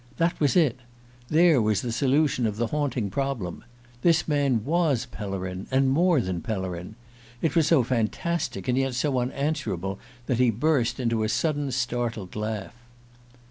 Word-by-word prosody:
That 170 Hz, +1 st, +1 dB
was 145 Hz, -4 st, +2 dB
it 150 Hz, -8 st, +3 dB, 0.5 s
there 160 Hz, -3 st, +5 dB
was 105 Hz, -2 st, +1 dB
the 120 Hz, -, -2 dB
solution 135 Hz, 0 st, +2 dB
of 105 Hz, -1 st, -4 dB
the 120 Hz, -, +1 dB
haunting 125 Hz, -6 st, -1 dB
problem! 135 Hz, -10 st, -3 dB, 0.4 s
This 165 Hz, +1 st, +3 dB
man 140 Hz, -7 st, +1 dB
was 150 Hz, -6 st, +1 dB
Pellerin, 95 Hz, -5 st, -5 dB
and 130 Hz, 0 st, +2 dB
more 170 Hz, +2 st, +3 dB
than 90 Hz, -6 st, -2 dB
Pellerin! 95 Hz, -3 st, -4 dB, 0.4 s
It 155 Hz, 0 st, -1 dB
was 160 Hz, -3 st, +4 dB
so 155 Hz, -5 st, +4 dB
fantastic 130 Hz, +9 st, -2 dB
and 125 Hz, +1 st, +2 dB
yet 135 Hz, -2 st, 0 dB
so 130 Hz, 0 st, +1 dB
unanswerable 125 Hz, -, -2 dB, 0.3 s
that 125 Hz, -1 st, 0 dB
he 125 Hz, -1 st, +5 dB
burst 125 Hz, +2 st, +1 dB
into 115 Hz, -3 st, 0 dB
a 110 Hz, -, 0 dB
sudden 145 Hz, +2 st, 0 dB
startled 120 Hz, -6 st, -2 dB
laugh. 105 Hz, -2 st, -4 dB
125 Hz, 155 wpm, -26 LUFS, 110-145 Hz, 0.5 s, there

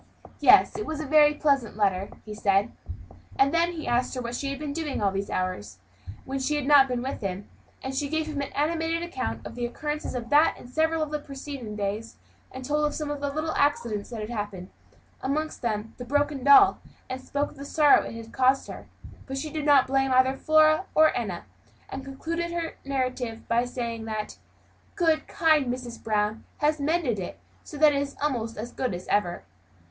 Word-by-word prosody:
"Yes, -, -, +6 dB
it 425 Hz, -, -4 dB
was 310 Hz, -1 st, -3 dB
a 310 Hz, -, -3 dB
very 300 Hz, +1 st, +5 dB
pleasant 275 Hz, -8 st, +1 dB
letter," 195 Hz, -2 st, +1 dB, 0.2 s
he 215 Hz, -, -7 dB
said; 200 Hz, -1 st, +1 dB, 0.7 s
and 275 Hz, +2 st, +3 dB
then 340 Hz, +1 st, +2 dB
he 320 Hz, -2 st, -6 dB
asked 245 Hz, +2 st, 0 dB
her 255 Hz, -, -3 dB
what 235 Hz, 0 st, -4 dB
she 275 Hz, +3 st, -3 dB
had 275 Hz, -, -4 dB
been 295 Hz, 0 st, -4 dB
doing 310 Hz, -2 st, -3 dB
in -, -, -2 dB
those 195 Hz, -1 st, -1 dB
hours 105 Hz, -, -3 dB, 0.5 s
when 270 Hz, +1 st, -3 dB
she 285 Hz, +3 st, 0 dB
had 295 Hz, -2 st, -1 dB
not 280 Hz, -1 st, +7 dB
been 250 Hz, -1 st, -2 dB
with 265 Hz, -, -4 dB
him; 195 Hz, 0 st, -4 dB, 0.4 s
and 265 Hz, -, -4 dB
she 280 Hz, +1 st, -2 dB
gave 315 Hz, +1 st, 0 dB
him 300 Hz, -2 st, -3 dB
an 280 Hz, -, -5 dB
animated 325 Hz, +3 st, 0 dB
account 345 Hz, +1 st, -4 dB
of -, -, -7 dB
the 245 Hz, -, -5 dB
occurrences 295 Hz, +5 st, -3 dB
of 240 Hz, +1 st, -5 dB
that 300 Hz, +2 st, +5 dB
and 245 Hz, -, -13 dB
several 320 Hz, +3 st, +1 dB
of 305 Hz, -, -5 dB
the 300 Hz, -, -1 dB
preceding 275 Hz, -6 st, -7 dB
days, 210 Hz, +2 st, -3 dB, 0.4 s
and 260 Hz, 0 st, -8 dB
told 300 Hz, +2 st, 0 dB
of 295 Hz, -, 0 dB
some 300 Hz, -2 st, -3 dB
little 290 Hz, +2 st, -2 dB
accidents 235 Hz, -8 st, 0 dB
that 230 Hz, -3 st, -6 dB
had 215 Hz, +2 st, -5 dB
happened 205 Hz, -5 st, -5 dB, 0.5 s
amongst 310 Hz, +4 st, -2 dB
them 220 Hz, -4 st, 0 dB
that 220 Hz, -, -14 dB
of -, -, -28 dB
the 245 Hz, -, -6 dB
broken 290 Hz, +1 st, 0 dB
doll; 285 Hz, +8 st, +7 dB, 0.3 s
and 260 Hz, 0 st, -5 dB
spoke 285 Hz, +2 st, -2 dB
of -, -, -17 dB
the 280 Hz, -, -7 dB
sorrow 295 Hz, 0 st, +5 dB
it -, -, -7 dB
had 225 Hz, 0 st, -9 dB
caused 260 Hz, +1 st, +3 dB
her; -, -, -9 dB, 0.4 s
but 270 Hz, 0 st, -4 dB
she 305 Hz, +2 st, -4 dB
did 305 Hz, -2 st, -3 dB
not 285 Hz, -3 st, +6 dB
blame 270 Hz, 0 st, +1 dB
either 260 Hz, +1 st, +4 dB
Flora 310 Hz, +4 st, +4 dB
or 315 Hz, 0 st, +5 dB
Enna, 200 Hz, -8 st, -3 dB, 0.4 s
and 270 Hz, -, -6 dB
concluded 330 Hz, +5 st, -4 dB
her 340 Hz, -1 st, -3 dB
narrative 255 Hz, -4 st, -3 dB
by 235 Hz, +1 st, +2 dB
saying 235 Hz, -2 st, -4 dB
that, 215 Hz, -1 st, -5 dB, 0.6 s
"good, 325 Hz, -4 st, +1 dB
kind 310 Hz, -6 st, +2 dB
Mrs. 245 Hz, -2 st, -7 dB
Brown 210 Hz, 0 st, 0 dB
had 300 Hz, +1 st, +1 dB
mended 285 Hz, -, 0 dB
it, 180 Hz, -, -6 dB, 0.2 s
so 300 Hz, -, -9 dB
that 300 Hz, 0 st, +6 dB
it 280 Hz, -, +1 dB
was 280 Hz, 0 st, -4 dB
almost 240 Hz, -6 st, -2 dB
as 235 Hz, +3 st, -5 dB
good 255 Hz, -8 st, -2 dB
as 180 Hz, -, -8 dB
ever." 180 Hz, -4 st, 0 dB
270 Hz, 210 wpm, -26 LUFS, 230-300 Hz, 0.7 s, not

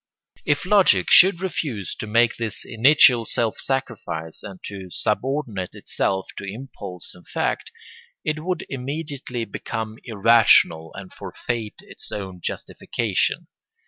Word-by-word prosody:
] -, -, -32 dB
If 145 Hz, -, -7 dB
logic 200 Hz, 0 st, +4 dB
should 185 Hz, -1 st, +7 dB
refuse 140 Hz, -, -3 dB
to 110 Hz, -, -5 dB
make 115 Hz, +2 st, +3 dB
this 115 Hz, -1 st, -4 dB
initial 125 Hz, 0 st, +5 dB
self 115 Hz, -2 st, 0 dB
sacrifice 110 Hz, -12 st, -3 dB
and 95 Hz, -3 st, -9 dB
to 95 Hz, -2 st, -7 dB
subordinate 110 Hz, -2 st, -2 dB
itself 95 Hz, 0 st, -2 dB
to -, -, -8 dB
impulse 100 Hz, -4 st, -7 dB
and 90 Hz, -, -16 dB
fact, -, -, -2 dB, 0.5 s
it 155 Hz, 0 st, -1 dB
would 180 Hz, -1 st, -2 dB
immediately 135 Hz, -2 st, -4 dB
become 110 Hz, -1 st, -5 dB
irrational 110 Hz, -7 st, +4 dB
and 95 Hz, -1 st, -9 dB
forfeit 115 Hz, -3 st, -4 dB
its -, -, -9 dB
own 95 Hz, -3 st, -6 dB
justification. -, -, -1 dB
115 Hz, 125 wpm, -23 LUFS, 100-135 Hz, 0.5 s, should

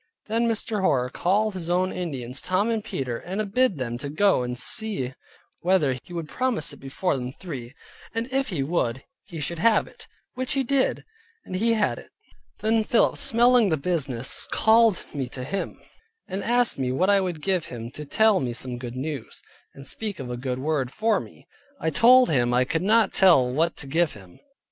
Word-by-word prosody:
Then 230 Hz, +2 st, 0 dB
Mr. 220 Hz, -2 st, -1 dB
Hoar 125 Hz, -9 st, +1 dB
called 205 Hz, +7 st, +1 dB
his 175 Hz, -3 st, -5 dB
own 185 Hz, +1 st, +1 dB
Indians, 135 Hz, -7 st, -4 dB
Tom 200 Hz, +5 st, +1 dB
and 220 Hz, -2 st, -1 dB
Peter, 125 Hz, -9 st, -4 dB
and 195 Hz, +3 st, -4 dB
bid 255 Hz, -8 st, +3 dB
them 120 Hz, -3 st, -3 dB
go 150 Hz, +6 st, +2 dB
and 125 Hz, 0 st, -3 dB
see 135 Hz, -, -2 dB, 0.5 s
whether 170 Hz, -7 st, +2 dB
he -, -, -17 dB
would 170 Hz, -3 st, -4 dB
promise 255 Hz, -, -1 dB
it -, -, -12 dB
before 140 Hz, +6 st, -1 dB
them 125 Hz, -1 st, -4 dB
three; 140 Hz, -8 st, -8 dB, 0.4 s
and 230 Hz, +1 st, -1 dB
if 270 Hz, 0 st, +1 dB
he 170 Hz, -10 st, -2 dB
would, 135 Hz, -5 st, -1 dB, 0.2 s
he 165 Hz, -, -8 dB
should 160 Hz, +3 st, -3 dB
have 220 Hz, +3 st, +4 dB
it; -, -, -15 dB, 0.3 s
which 255 Hz, 0 st, -3 dB
he 270 Hz, -1 st, +1 dB
did, 265 Hz, +1 st, 0 dB, 0.4 s
and 185 Hz, -, -6 dB
he 230 Hz, +4 st, +2 dB
had 215 Hz, -2 st, 0 dB
it. -, -, -14 dB, 0.5 s
Then 220 Hz, 0 st, +2 dB
Philip 230 Hz, -, +3 dB
smelling 240 Hz, -3 st, +4 dB
the 160 Hz, -, +1 dB
business 140 Hz, -6 st, -1 dB
called 220 Hz, -3 st, +4 dB
me 135 Hz, -4 st, -3 dB
to 130 Hz, 0 st, -6 dB
him, 195 Hz, +9 st, -4 dB, 0.5 s
and 195 Hz, +1 st, -4 dB
asked 240 Hz, -, +2 dB
me 130 Hz, -1 st, 0 dB
what 185 Hz, +10 st, +2 dB
I 200 Hz, -1 st, +4 dB
would 180 Hz, -4 st, -3 dB
give 185 Hz, 0 st, 0 dB
him, 120 Hz, -1 st, -7 dB
to 150 Hz, -, -7 dB
tell 215 Hz, +7 st, +3 dB
me 125 Hz, -2 st, -2 dB
some 125 Hz, 0 st, -5 dB
good 120 Hz, -1 st, -7 dB
news, 140 Hz, -1 st, -5 dB, 0.4 s
and 140 Hz, 0 st, -8 dB
speak 210 Hz, -5 st, -2 dB
a -, -, -4 dB
good 125 Hz, 0 st, -3 dB
word 135 Hz, -2 st, -1 dB
for 220 Hz, +6 st, +1 dB
me. -, -, -13 dB, 0.3 s
I 160 Hz, -, -1 dB
told 250 Hz, -, +6 dB
him 120 Hz, -5 st, +2 dB
I 125 Hz, +1 st, +3 dB
could 165 Hz, +5 st, -1 dB
not 220 Hz, +4 st, +3 dB
tell 175 Hz, -10 st, +5 dB
what 160 Hz, +7 st, 0 dB
to -, -, -1 dB
give 165 Hz, +4 st, +1 dB
him. 95 Hz, -4 st, -15 dB
170 Hz, 195 wpm, -25 LUFS, 130-215 Hz, 0.5 s, told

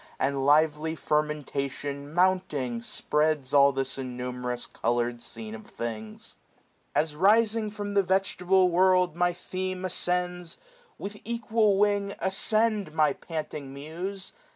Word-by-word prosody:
And 135 Hz, 0 st, 0 dB
lively 155 Hz, +1 st, +3 dB
fermentation, 145 Hz, -2 st, -2 dB
mounting, 165 Hz, -9 st, +1 dB
spreads 150 Hz, +1 st, 0 dB
All 140 Hz, -1 st, +7 dB
this 135 Hz, 0 st, -3 dB
innumerous 125 Hz, -1 st, -4 dB
colour'd 120 Hz, 0 st, -1 dB
scene 110 Hz, -2 st, -7 dB
of 110 Hz, 0 st, -9 dB
things. 110 Hz, -2 st, -6 dB, 0.6 s
As 155 Hz, -1 st, +1 dB
rising 215 Hz, +4 st, +3 dB
from 205 Hz, -1 st, -5 dB
the 200 Hz, -, +5 dB
vegetable 190 Hz, -1 st, +2 dB
world 180 Hz, -1 st, +3 dB
My 175 Hz, 0 st, +2 dB
theme 185 Hz, +1 st, -4 dB
ascends, 180 Hz, -1 st, -2 dB, 0.4 s
with 205 Hz, +1 st, -6 dB
equal 225 Hz, -3 st, +1 dB
wing 200 Hz, -1 st, +1 dB
ascend, 215 Hz, +2 st, +1 dB
570 155 Hz, -, -18 dB
My 155 Hz, -3 st, +4 dB
panting 150 Hz, -4 st, -6 dB
Muse 175 Hz, +7 st, -6 dB
160 Hz, 120 wpm, -27 LUFS, 140-190 Hz, 0.6 s, All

